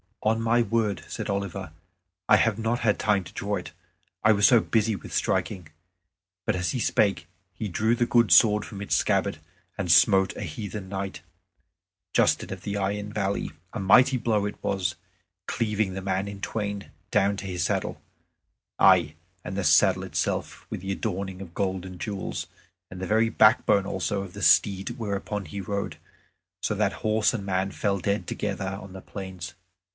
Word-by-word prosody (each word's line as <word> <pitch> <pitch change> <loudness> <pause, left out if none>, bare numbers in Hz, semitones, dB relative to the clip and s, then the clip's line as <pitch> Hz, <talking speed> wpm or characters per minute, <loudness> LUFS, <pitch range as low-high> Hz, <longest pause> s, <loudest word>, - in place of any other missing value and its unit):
"On 110 +1 +2
my 115 +1 +3
word," 115 -4 0
said - - -5
Oliver, 100 -3 -4 0.6
"I 105 - +8
have 105 0 +2
not 115 +2 0
had 105 -3 +1
time 105 -2 +2
to - - -13
draw 100 +1 -2
it; 90 - -6 0.5
I 110 - +6
was 105 -1 +5
so 120 -3 +6
busy 110 0 +1
with 85 - -9
striking." 90 -4 -1 0.8
But 110 - +1
as 90 0 -1
he 130 - -2
spake 95 -7 +1 0.3
he 110 - -4
drew 110 +5 +1
the 120 - +1
good 120 -2 +3
sword 105 -2 +6
from 100 -3 -8
its 100 - 0
scabbard, - - +1 0.4
and 90 -4 +1
smote 95 +2 +5
a - - -6
heathen 100 +2 -6
knight, 95 0 -4 0.9
Justin - - +2
of - - -9
the 100 0 -3
Iron 100 +1 -2
Valley. 100 -2 -1 0.2
A - - -4
mighty 125 +7 +5
blow 110 -4 +1
it 105 - -4
was, 95 -2 -1 0.5
cleaving 105 -4 0
the 95 - -4
man 95 +1 -1
in 100 0 -7
twain 100 -2 -4 0.2
down 100 -1 +2
to 100 - -6
his 90 -2 -2
saddle - - -2 0.8
aye, 90 -5 +5 0.3
and - - -5
the 100 - -1
saddle - - +4
itself - - -3
with - - -5
its 95 0 -2
adorning 95 -2 -4
of 85 -3 -10
gold 95 -2 -1
and 90 -1 -9
jewels, 100 -1 -4 0.4
and 95 0 -9
the 95 - -3
very 110 +2 +3
backbone 110 -3 +4
also 100 +1 -2
of 95 -2 -8
the - - -6
steed 100 +3 +4
whereon 105 -2 -3
he 100 - -6
rode, 100 +1 -3 0.6
so - - 0
that - - +1
horse 110 +1 +2
and 100 -4 -4
man 95 0 0
fell 100 -1 -1
dead 100 +3 -1
together 100 -2 -3
on 95 -1 -11
the 95 - -8
plains. 95 -4 -7
100 Hz, 180 wpm, -26 LUFS, 95-105 Hz, 0.9 s, I